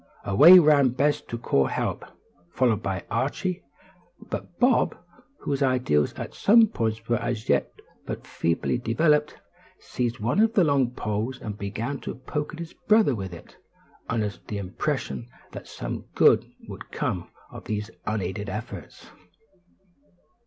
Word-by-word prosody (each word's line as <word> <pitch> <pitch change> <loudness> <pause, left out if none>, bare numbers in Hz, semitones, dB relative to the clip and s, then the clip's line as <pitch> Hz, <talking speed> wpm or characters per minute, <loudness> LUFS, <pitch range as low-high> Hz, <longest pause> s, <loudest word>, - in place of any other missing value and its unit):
Away 155 - +9
ran 150 -5 +5
Bess 140 +4 +1
to 115 - -4
call 70 - +1
help, - - -2 0.5
followed 115 +1 +1
by 95 -3 -3
Archie; 145 +10 -1 0.6
but 175 - -7
Bob, 250 0 +3 0.4
whose 140 0 -2
ideas 125 - +2
on - - -6
some 225 +2 +5
points 115 - -3
were 120 - +2
as 115 -3 -3
yet - - +1 0.4
but - - -5
feebly 85 +8 -1
developed, 150 +5 +1 0.4
seized 120 -1 -3
one 120 - 0
of 225 +1 +4
the 190 - +5
long 140 -5 +2
poles, 115 +2 -3
and 105 -2 -6
began 115 +7 -4
to - - -6
poke 150 +5 -4
at - - -8
his 170 -1 -7
brother 215 -9 +5
with 95 -5 -5
it, 85 - -13 0.5
under 110 -3 0 0.2
the 105 - -4
impression 115 +5 -3 0.2
that - - -9
some - - -6
good - - +4 0.2
would - - -9
come - - -3 0.2
of - - -10
these 105 +1 -3 0.2
unaided 105 -1 -3
efforts. 110 +3 -7
120 Hz, 145 wpm, -25 LUFS, 105-150 Hz, 0.6 s, Away